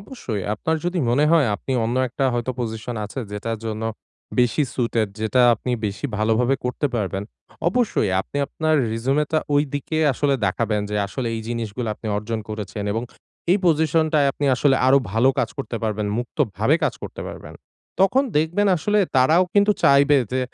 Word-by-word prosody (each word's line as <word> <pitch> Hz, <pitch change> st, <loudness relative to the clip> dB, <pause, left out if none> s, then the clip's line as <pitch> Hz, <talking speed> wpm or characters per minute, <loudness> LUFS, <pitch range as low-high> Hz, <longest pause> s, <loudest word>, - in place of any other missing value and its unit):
অবশ্যই 130 Hz, -, -5 dB
আপনার 160 Hz, +9 st, -1 dB
যদি 175 Hz, 0 st, -1 dB
মনে 145 Hz, +5 st, +3 dB
হয় 155 Hz, -6 st, +5 dB
আপনি 130 Hz, +6 st, -4 dB
অন্য 120 Hz, +3 st, -1 dB
একটা 135 Hz, +3 st, -2 dB
হয়তো 120 Hz, +1 st, -1 dB
পজিশন 110 Hz, +1 st, -4 dB
আছে 105 Hz, +6 st, -8 dB
যেটার 110 Hz, +2 st, -3 dB
জন্য 110 Hz, 0 st, -4 dB, 0.6 s
বেশি 125 Hz, +4 st, +3 dB
সুইটেড 115 Hz, -3 st, 0 dB
যেটা 115 Hz, +4 st, +2 dB
আপনি 125 Hz, +3 st, -5 dB, 0.2 s
বেশি 100 Hz, +8 st, -3 dB
ভালোভাবে 115 Hz, +4 st, +2 dB
করতে 125 Hz, +4 st, -1 dB
পারবেন। 100 Hz, -3 st, -2 dB, 0.5 s
অবশ্যই 200 Hz, -, +1 dB
আপনি 140 Hz, -, -8 dB
আপনার 155 Hz, -1 st, 0 dB, 0.2 s
রিসিউম 130 Hz, +6 st, 0 dB
টা 155 Hz, -, +4 dB, 0.2 s
ওই 145 Hz, -, +4 dB
দিকে 145 Hz, +3 st, -3 dB, 0.2 s
আসলে 140 Hz, +2 st, +1 dB
দেখাবেন 105 Hz, +2 st, 0 dB
যে 105 Hz, -, -1 dB
আসলে 120 Hz, +3 st, -4 dB
এই 110 Hz, -, -3 dB
জিনিসগুলা 115 Hz, 0 st, -3 dB
আপনি 110 Hz, -, -10 dB
অর্জন 110 Hz, +1 st, -3 dB
করেছেন 105 Hz, -1 st, -5 dB
এবং 115 Hz, +2 st, -2 dB, 0.5 s
এই 205 Hz, -, +3 dB
পজিশনটায় 155 Hz, -2 st, +3 dB
আপনি 145 Hz, -, -4 dB
আসলে 135 Hz, +1 st, +3 dB
আরো 135 Hz, +1 st, +6 dB
ভালো 115 Hz, +4 st, +3 dB
কাজ 115 Hz, -, +1 dB
করতে 125 Hz, -3 st, -4 dB
পারবেন 105 Hz, -1 st, -1 dB
মুক্তভাবে 120 Hz, -2 st, 0 dB
কাজ -, -, 0 dB
করতে -, -, -7 dB
পারবেন। -, -, -10 dB, 0.5 s
তখন 225 Hz, +8 st, +4 dB
দেখবেন 175 Hz, +7 st, +2 dB
আসলে 210 Hz, +6 st, +1 dB, 0.2 s
তারাও 155 Hz, +8 st, +5 dB
কিন্তু 205 Hz, +1 st, +5 dB
চাইবে 140 Hz, +1 st, +5 dB, 0.2 s
যে 130 Hz, -, +1 dB
125 Hz, 170 wpm, -22 LUFS, 110-150 Hz, 0.6 s, আরো